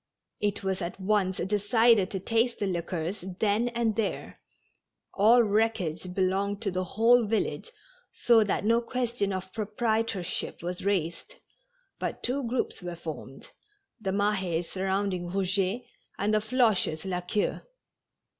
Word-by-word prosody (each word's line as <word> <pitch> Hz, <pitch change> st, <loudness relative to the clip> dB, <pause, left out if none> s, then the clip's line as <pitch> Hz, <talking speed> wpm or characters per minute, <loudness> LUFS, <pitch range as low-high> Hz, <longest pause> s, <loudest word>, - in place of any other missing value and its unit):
It 205 Hz, -1 st, -1 dB
was 190 Hz, 0 st, -1 dB
at 175 Hz, +2 st, -5 dB
once 190 Hz, -1 st, +1 dB
de 200 Hz, +3 st, 0 dB
cided 225 Hz, -1 st, +4 dB
to 195 Hz, -, -3 dB
taste 230 Hz, +5 st, +1 dB
the 205 Hz, -, -1 dB
liquors 175 Hz, 0 st, -3 dB, 0.2 s
then 215 Hz, +2 st, +2 dB
and 235 Hz, -2 st, 0 dB
there; 220 Hz, -2 st, -3 dB, 0.7 s
all 230 Hz, +4 st, +6 dB
wreckage 200 Hz, -5 st, 0 dB
belonged 195 Hz, +2 st, 0 dB
to 200 Hz, -, 0 dB
the 185 Hz, +1 st, -1 dB
whole 230 Hz, +5 st, +4 dB
village, 225 Hz, -, -1 dB, 0.4 s
so 230 Hz, -2 st, +4 dB
that 200 Hz, -, -1 dB
no 230 Hz, +2 st, +4 dB
question 235 Hz, -4 st, -1 dB
of 185 Hz, 0 st, -5 dB
proprietorship 220 Hz, -5 st, -2 dB
was 180 Hz, +1 st, -4 dB
raised, 185 Hz, -, -1 dB, 0.6 s
but -, -, -4 dB
two 265 Hz, +3 st, 0 dB
groups 245 Hz, -3 st, -2 dB
were 175 Hz, -1 st, -5 dB
formed, 155 Hz, -5 st, -8 dB, 0.5 s
the 205 Hz, -3 st, -3 dB
Mahes 190 Hz, -4 st, 0 dB
surrounding 190 Hz, -2 st, -1 dB
Eouget, 195 Hz, +4 st, 0 dB, 0.3 s
and 205 Hz, +2 st, 0 dB
the 215 Hz, -, +4 dB
Floches 215 Hz, -8 st, +1 dB
La 180 Hz, -2 st, -2 dB
Queue. 200 Hz, +4 st, -1 dB
200 Hz, 135 wpm, -28 LUFS, 185-225 Hz, 0.7 s, all